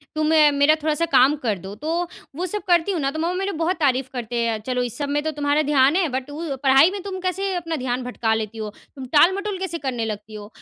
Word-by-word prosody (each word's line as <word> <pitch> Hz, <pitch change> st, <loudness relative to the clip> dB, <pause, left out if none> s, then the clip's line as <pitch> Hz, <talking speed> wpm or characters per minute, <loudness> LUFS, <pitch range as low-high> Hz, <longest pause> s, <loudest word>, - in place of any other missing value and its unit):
"तुम 310 Hz, 0 st, 0 dB, 0.3 s
मेरा 285 Hz, +2 st, +4 dB
थोड़ा-सा 310 Hz, +1 st, +1 dB
काम 285 Hz, -3 st, +4 dB
कर 215 Hz, -4 st, +1 dB
दो।" 190 Hz, +2 st, -8 dB
तो 330 Hz, +8 st, -2 dB, 0.3 s
वो 350 Hz, +4 st, -2 dB
सब 415 Hz, +3 st, -3 dB
करती 350 Hz, +1 st, +3 dB
हूँ 355 Hz, -, -1 dB
ना, 275 Hz, 0 st, 0 dB
तो 315 Hz, -, -5 dB
मम्मा 335 Hz, +2 st, 0 dB
मेरे 390 Hz, +2 st, -2 dB
बहुत 360 Hz, +3 st, +1 dB
तारीफ़ 265 Hz, -3 st, +1 dB
करते 245 Hz, -2 st, -5 dB
हैं, 225 Hz, -2 st, -1 dB
"चलो, 250 Hz, +2 st, -1 dB
इस 240 Hz, -3 st, -4 dB
सब 285 Hz, -1 st, -3 dB
में 290 Hz, +1 st, 0 dB
तो 315 Hz, -, -1 dB
तुम्हारा 290 Hz, 0 st, +1 dB
ध्यान 275 Hz, +1 st, +4 dB
है, 365 Hz, -2 st, +2 dB
बट 260 Hz, +1 st, -4 dB
उ 300 Hz, -1 st, -4 dB
पढ़ाई 270 Hz, +5 st, +6 dB
में 400 Hz, 0 st, -5 dB
तुम 385 Hz, -2 st, -5 dB
कैसे 380 Hz, +1 st, -1 dB
अपना 330 Hz, -2 st, -3 dB
ध्यान 255 Hz, -2 st, -2 dB
भटका 240 Hz, -2 st, -1 dB
लेती 220 Hz, 0 st, -3 dB
हो? 215 Hz, -1 st, -4 dB, 0.3 s
तुम 265 Hz, -2 st, -7 dB
टाल-मटोल 385 Hz, +6 st, +3 dB
कैसे 375 Hz, -3 st, -3 dB
करने 240 Hz, -3 st, -2 dB
लगती 210 Hz, 0 st, -6 dB
हो?" 210 Hz, -1 st, -8 dB
290 Hz, 250 wpm, -22 LUFS, 250-345 Hz, 0.3 s, पढ़ाई